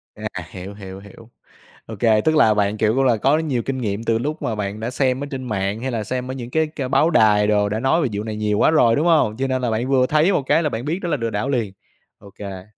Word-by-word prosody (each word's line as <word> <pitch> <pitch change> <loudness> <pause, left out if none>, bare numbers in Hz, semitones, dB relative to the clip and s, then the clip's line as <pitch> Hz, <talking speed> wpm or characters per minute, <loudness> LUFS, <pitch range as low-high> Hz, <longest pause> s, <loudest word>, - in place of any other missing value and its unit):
À, - - -5 0.2
hiểu, 95 +2 -8
hiểu, 95 -2 -9
hiểu. 100 +3 -15 0.6
Ô 110 - -8
kê, 110 0 +3
tức 155 +7 +1
là 110 -8 +5
bạn, 105 0 0
kiểu, 110 +1 +1
cũng 135 - +2
là 125 -4 +3
có 140 +8 +2
nhiều 145 -7 -1
kinh 135 -1 -3
nghiệm 110 -3 -3
từ 115 -1 +1
lúc 150 +6 -4
mà 115 - -2
bạn 105 0 -4
đã 115 +2 -3
xem 130 +1 0
ở - - -5
trên 130 -1 -5
mạng 105 -2 -2
hay 130 +1 -3
là 115 -3 -2
xem 125 +3 -4
ở - - -4
những 125 -2 -7
cái 160 +3 +1
c 140 -4 -5
báo 160 - +3
đài 105 -7 +4
đồ 105 -1 +2
đã 105 +2 -2
nói 135 +7 +2
về 145 - +1
vụ 100 +1 -3
này 110 -1 -5
nhiều 105 -1 -1
quá - - +4
rồi, 120 -8 +4
đúng 150 - 0
hông? 150 -10 +3
Cho 135 - -1
nên 130 -1 -1
là 125 - 0
bạn 115 +4 -1
vừa 130 -2 +3
thấy 155 +8 +2
một 145 - 0
cái 155 +5 +2
là 150 - +1
bạn 115 -1 -5
biết 165 +5 -2
đó 175 - -3
là 150 - 0
lừa 115 -2 -2
đảo 110 +5 -2
liền. 115 -8 -1 0.5
Ô 100 - -14
kê. 95 -2 -8
115 Hz, 295 wpm, -21 LUFS, 105-135 Hz, 0.6 s, là